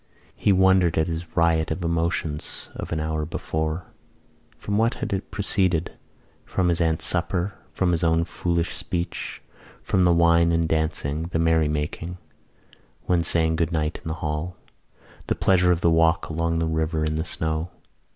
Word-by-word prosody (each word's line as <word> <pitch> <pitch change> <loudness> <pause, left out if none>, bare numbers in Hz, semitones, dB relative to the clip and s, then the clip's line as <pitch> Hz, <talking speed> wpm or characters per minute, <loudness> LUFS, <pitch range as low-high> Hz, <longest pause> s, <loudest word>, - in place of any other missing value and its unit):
He 100 - +2
wondered 95 -3 +4
at 80 - +3
his 80 0 -6
riot 80 -1 +3
of 90 +3 -3
emotions 85 -2 -2
of - - -7
an 80 - -1
hour 80 0 -1
before. 80 +1 -3 0.7
From 100 - -3
what 115 +2 +2
had - - -3
it 95 - -3
proceeded? 90 -4 0 0.5
From 90 -2 0
his 85 0 +1
aunt's 80 0 +1
supper, 90 +2 0 0.2
from 90 -2 +1
his 85 -1 +1
own 80 0 +3
foolish 85 0 -1
speech, 85 0 -4 0.4
from 95 - +2
the 90 - +5
wine 85 0 +4
and 85 -1 +1
dancing, 80 0 -1
the 85 - -2
merry 80 -1 +3
making 75 +4 -3 0.9
when 85 -2 +1
saying 80 -1 +2
good 85 0 0
night 80 -1 -1
in - - -8
the 80 - -2
hall, 75 +4 -3 0.7
the - - +1
pleasure 90 -1 +3
of 85 -1 +1
the 85 - +4
walk 80 +1 +3
along 85 +1 0
the 80 - +1
river 80 0 0
in 75 0 -1
the 80 - -1
snow. 80 0 -2
85 Hz, 170 wpm, -24 LUFS, 80-85 Hz, 0.9 s, the